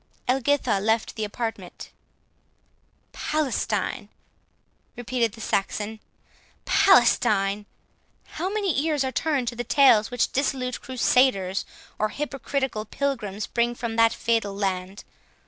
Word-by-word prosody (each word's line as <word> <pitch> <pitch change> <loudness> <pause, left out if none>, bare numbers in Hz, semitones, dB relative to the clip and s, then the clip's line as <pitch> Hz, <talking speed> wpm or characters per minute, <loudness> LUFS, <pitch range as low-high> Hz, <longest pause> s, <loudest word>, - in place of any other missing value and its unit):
Elgitha 260 -3 +1
left 220 +2 0
the 220 - -4
apartment. 225 +2 -5 1.2
"Palestine!" 300 -4 -2 0.9
repeated 240 -2 -1
the 225 - -11
Saxon; 210 +2 -2 0.7
"Palestine! 200 0 +3 0.6
how 355 +4 -4
many 390 -9 0
ears 305 -3 +1
are 260 - -2
turned 275 -2 0
to 240 - -2
the 245 - -3
tales 240 -4 +5
which 245 -1 0
dissolute 260 -2 -1
crusaders, 245 -6 +2 0.3
or 215 - +1
hypocritical 275 -4 -3
pilgrims, 215 -4 -3
bring 240 0 0
from 235 -1 -4
that 230 0 +5
fatal 225 -4 -1
land! 190 0 -3
235 Hz, 110 wpm, -25 LUFS, 210-270 Hz, 1.2 s, tales